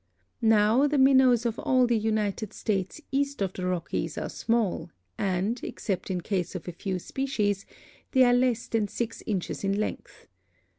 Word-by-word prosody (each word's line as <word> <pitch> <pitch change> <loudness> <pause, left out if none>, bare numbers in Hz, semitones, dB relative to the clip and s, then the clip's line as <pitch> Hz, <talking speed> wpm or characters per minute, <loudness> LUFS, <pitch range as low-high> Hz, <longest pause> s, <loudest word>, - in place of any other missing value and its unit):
Now 225 +4 +4
the 295 0 0
Minnows 260 -3 +5
of 230 -1 -1
all 255 -1 +3
the 240 -1 +2
United 215 -1 -1
States 195 - -2
east 280 +1 0
of 190 -2 -1
the 180 -1 -3
Rockies 180 -2 -2
are - - -3
small 215 -7 -1 0.3
and, 195 +5 -1
except 195 -2 -3
in 180 -2 -1
case 185 -1 -2
of 185 - -6
a - - -3
few 185 +2 -3
species, 205 -2 -2 0.4
they 260 -2 +5
are 245 -1 +5
less 245 -2 +2
than 220 -2 0
six 230 +2 -4
inches 195 -3 -2
in 195 +1 0
length. 215 - -5
215 Hz, 165 wpm, -27 LUFS, 195-245 Hz, 0.4 s, Minnows